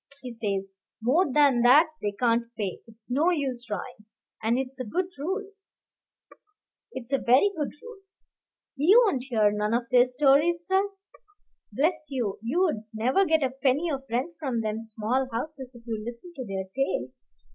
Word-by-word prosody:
He 250 - -6
says, 200 -4 -3 0.3
'More 270 +8 +2
than 280 -4 +4
that 285 +7 +6
they 205 - -1
can't 230 +1 +1
pay. 200 -4 -3
It's 225 +1 -11
no 300 +7 +3
use 270 -8 -1
trying.' 215 +2 -7 0.3
And 225 +2 +1
it's 265 0 -4
a - - -2
good 355 - -1
rule; 385 +7 -3 1.4
it's 260 0 -7
a 275 - +3
very 260 +14 +4
good 295 -3 -2
rule. 470 -3 -11 0.8
He 310 +9 +4
won't 270 - 0
hear 220 -5 +2
none 210 +2 0
of 240 - 0
their 245 -1 +6
stories, 295 +6 +3
sir. 385 +2 +2 0.8
Bless 305 - 0
you, 240 -8 -2
you'd 265 - 0
never 255 - +2
get 320 -3 +2
a 260 - 0
penny 270 +5 0
of 270 -2 -2
rent 255 +9 -1
from 260 -7 -1
them 215 0 -3
small 225 +4 -2
houses 260 +1 -5
if 235 -1 -15
you 220 -2 -4
listened 240 +10 -8
to 260 - -5
their 190 -1 -3
tales. 135 - -2
255 Hz, 170 wpm, -26 LUFS, 225-300 Hz, 1.4 s, that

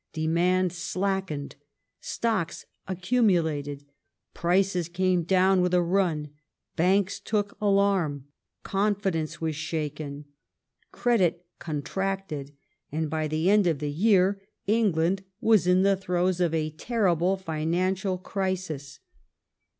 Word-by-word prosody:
Demand 175 +3 +1
slackened; 185 -5 -2 0.4
stocks 220 -8 -2 0.2
accumulated; 170 - 0 0.5
prices 180 -1 +1
came 180 0 +1
down 185 +2 +3
with 180 0 +2
a 180 - +4
run; 170 -5 0 0.4
banks 190 +3 +2
took 205 -2 -2
alarm; 195 -9 +2 0.4
confidence 195 -5 -1
was 160 -1 -2
shaken; 150 -2 -4 0.7
credit 180 -8 +1
contracted, 155 -1 -3 0.4
and 155 0 -2
by 155 -1 -1
the 155 +3 -1
end 205 -1 +5
of 165 -4 +1
the 145 +1 -3
year 195 +3 +3 0.2
England 195 -4 +2 0.2
was 215 -6 +4
in 180 +1 +4
the 195 0 +4
throes 180 -1 0
of 175 -3 +2
a 155 -1 -1
terrible 185 -1 +1
financial 185 +3 -1
crisis. 180 -7 -4
180 Hz, 105 wpm, -27 LUFS, 160-195 Hz, 0.7 s, end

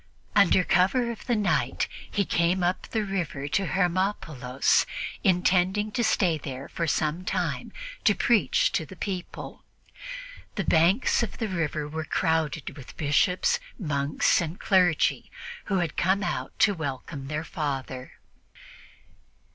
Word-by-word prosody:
Under 200 -2 +5
cover 215 +8 +2
of 230 - -10
the 240 - +2
night, 210 -2 +1 0.2
he 200 -2 0
came 175 +2 +1
up 180 +1 0
the 220 -2 -1
river 170 -8 -3
to 195 +5 0
Hermopolis, 170 -9 +1 0.4
intending 185 +3 +2
to 240 +3 0
stay 175 -7 +2
there 135 -1 -6
for 170 - -3
some 155 +3 0
time - - -2 0.3
to 205 - +4
preach 235 -4 +3
to - - 0
the 185 - -11
people. 185 0 -6 0.9
The - - -1
banks 175 +12 +3
of 230 - -3
the 225 - -2
river 160 -5 -2
were 160 +2 -4
crowded 155 -2 -1
with 135 -3 -12
bishops, 180 - +2 0.2
monks 145 -6 +1
and 165 +1 -4
clergy 180 -5 +2 0.4
who 195 - 0
had 175 -4 -1
come 190 +3 +2
out - - -3
to 205 - +4
welcome 140 -3 -5
their 150 +2 -3
Father. 135 -6 -4
175 Hz, 135 wpm, -26 LUFS, 150-195 Hz, 0.9 s, Under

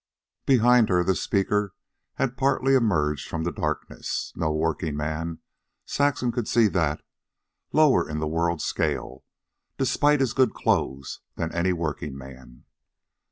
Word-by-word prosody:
Behind 125 -3 +5
her 90 -2 +3
the 95 - +2
speaker 100 +1 0 0.4
had 125 -1 -1
partly 135 0 +2
emerged 80 - +1
from 80 -1 -3
the 85 - -1
darkness. - - -4
No 80 -1 -1
workingman, 80 0 -2 0.4
Saxon 140 -4 0
could 120 -2 -3
see 115 0 +4
that 80 -6 -1 0.7
lower 145 - +4
in 75 - -3
the 75 0 -2
world 85 +1 -1
scale, - - -2 0.5
despite 145 +3 +2
his 130 -3 +1
good 130 -1 +2
clothes, 65 +1 -1 0.2
than 80 0 -3
any 85 +2 +1
workingman. 70 -6 -6
85 Hz, 125 wpm, -25 LUFS, 75-125 Hz, 0.7 s, Behind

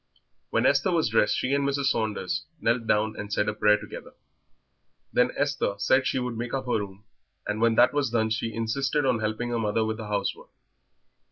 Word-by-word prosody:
When - - +1
Esther 190 - +3
was 165 -9 +2
dressed, 105 -2 +2
she 130 - -1
and 140 0 +2
Mrs. 140 0 +1
Saunders 110 -2 -2
knelt 115 -1 0
down 110 0 +1
and 105 0 -7
said 105 - +1
a 105 - 0
prayer 105 0 +4
together. 105 0 -10 1.0
Then 125 0 +4
Esther 140 -8 0
said 130 +6 +2
she - - 0
would 125 -2 -2
make 120 +3 -3
up 135 -1 -3
her 125 -3 +1
room, 100 0 -8 0.4
and 105 +1 -2
when 115 -1 +3
that - - +5
was 145 -3 +1
done 110 -1 0
she 115 0 -1
insisted 135 +6 -1
on 125 -3 +2
helping 110 +3 -2
her 120 -1 -1
mother 110 0 0
with 110 0 -2
the 110 -2 -7
housework. 100 -1 -3
115 Hz, 200 wpm, -26 LUFS, 105-130 Hz, 1.0 s, that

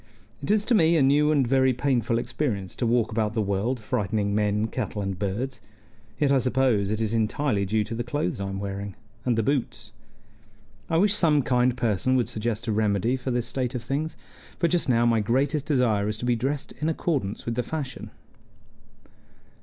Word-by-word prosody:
"It 140 - -5
is 210 0 +3
to 245 - +2
me 165 -5 +4
a 145 - +4
new 145 +3 +4
and 140 -4 +3
very 130 +1 +3
painful 120 -3 0
experience 120 -6 -2
to 120 - 0
walk 115 -1 +2
about 110 0 -1
the - - +1
world 100 +6 -1
frightening 105 -3 -1
men, 105 0 +1
cattle, 110 -1 -4
and 95 -2 -4
birds; 120 +7 -3 0.6
yet 145 -2 +3
I 135 - +4
suppose 125 -6 +1
it 110 +1 -1
is 110 -1 -1
entirely 110 -1 0
due 110 +2 +1
to 110 - -6
the 120 +1 -2
clothes 120 -6 -2
I 95 - -3
am 95 0 -4
wearing 100 0 -5 0.3
and 120 -3 +1
the 115 - +2
boots. 140 +1 -2 1.0
I 165 - +2
wish 200 +3 +4
some 155 -8 +3
kind 125 0 +2
person 120 +2 +1
would 125 -2 +1
suggest 110 +1 -3
a 115 - -1
remedy 105 +2 +1
for 130 0 -5
this 120 -1 0
state 125 0 -2
of 120 - -3
things; 145 +6 -3 0.4
for 170 - +2
just 170 -4 0
now 120 -1 +3
my 115 -1 +3
greatest 135 +7 0
desire 120 -8 +2
is 105 0 -2
to 120 - -5
be 120 -1 +2
dressed 135 +5 -2
in 155 - +1
accordance 140 - -2
with 115 - -1
the 125 - 0
fashion." 135 -2 -5
120 Hz, 200 wpm, -25 LUFS, 105-135 Hz, 1.0 s, me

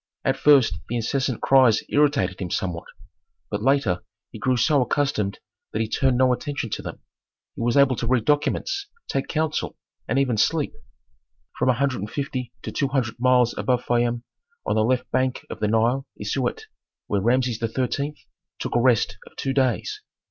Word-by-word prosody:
At 135 -1 +2
first 135 -13 +4
the 120 - -2
incessant 130 +1 -1
cries 130 -5 +5
irritated 140 -12 +2
him 90 - -3
somewhat, 85 -1 -3 0.6
but 105 - -2
later 130 -8 +2 0.3
he - - -9
grew 130 -1 +1
so 145 +3 +3
accustomed 125 -7 0 0.3
that 110 - -2
he 110 - 0
turned 130 +2 +1
no 130 0 +4
attention 140 -4 -4
to - - -3
them. - - -8 0.5
He - - -6
was 120 +3 +1
able 140 -2 +5
to 115 - -2
read 120 -2 +2
documents, 385 - 0 0.2
take 135 - -2
counsel, 155 -1 -2 0.3
and 135 - 0
even 130 -5 +2
sleep. - - +1 0.9
From - - +2
a - - +5
hundred 135 0 0
and 105 +2 -5
fifty 130 -3 -4
to - - -5
two 140 - 0
hundred 130 -4 -1
miles 125 -1 +3
above 125 -1 0
Fayum 120 0 +1 0.4
on - - +1
the 110 - +2
left 125 +2 +1
bank 130 0 0
of - - -6
the 105 - +1
Nile 115 +5 +1
is 105 - -3
Siut, 130 -3 -1 0.4
where 100 -1 0
Rameses 120 +1 +1
XIII. 130 +5 -2 0.4
took - - -4
a 120 - +4
rest 115 -4 +2
of - - -17
two 135 - -2
days. 135 - 0
125 Hz, 180 wpm, -24 LUFS, 115-135 Hz, 0.9 s, cries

